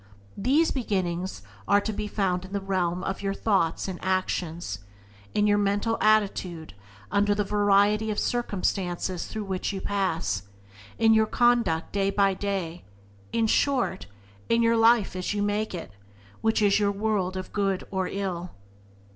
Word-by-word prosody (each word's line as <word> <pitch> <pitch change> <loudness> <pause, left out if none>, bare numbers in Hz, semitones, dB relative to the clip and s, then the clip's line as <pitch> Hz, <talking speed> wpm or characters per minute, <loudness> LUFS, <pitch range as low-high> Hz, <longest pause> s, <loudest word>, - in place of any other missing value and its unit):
These 280 +10 +2
beginnings 185 - -2 0.2
are 200 - +5
to 220 - -3
be 210 +1 -3
found 185 -3 -1
in 190 - -11
the 200 - 0
realm 185 -2 -1
of 190 - -3
your 195 -1 -1
own - - -13
thoughts 190 -7 +1
and 185 -2 -6
actions; 175 - -2 0.6
in 210 - +3
your 205 0 +3
mental 205 +3 +1
attitude 195 - +1 0.4
under 205 +1 +2
the 205 - +1
variety 205 +1 +3
of 210 - -2
circumstances 185 -6 -1
through 215 -1 -5
which 190 -2 -2
you 195 - -4
pass; 185 - -1 0.6
in 225 -1 +5
your 220 0 +4
conduct 235 -11 +2
day 195 -1 +1
by 195 -1 +3
day 185 -4 -3 0.2
— 100 0 -28
in 230 -1 +1
short, 250 -3 +1 0.4
in 230 0 +3
your 230 0 +4
life 225 -3 +4
as 185 +3 -2
you 205 - 0
make 205 0 -1
it, 165 - -7 0.5
which 220 -1 +2
is 200 0 +4
your 205 -1 +2
world 200 -3 -1
of 185 - -7
good 195 -2 0
or 190 -1 -1
ill. 185 -3 -4
200 Hz, 165 wpm, -26 LUFS, 185-215 Hz, 0.6 s, are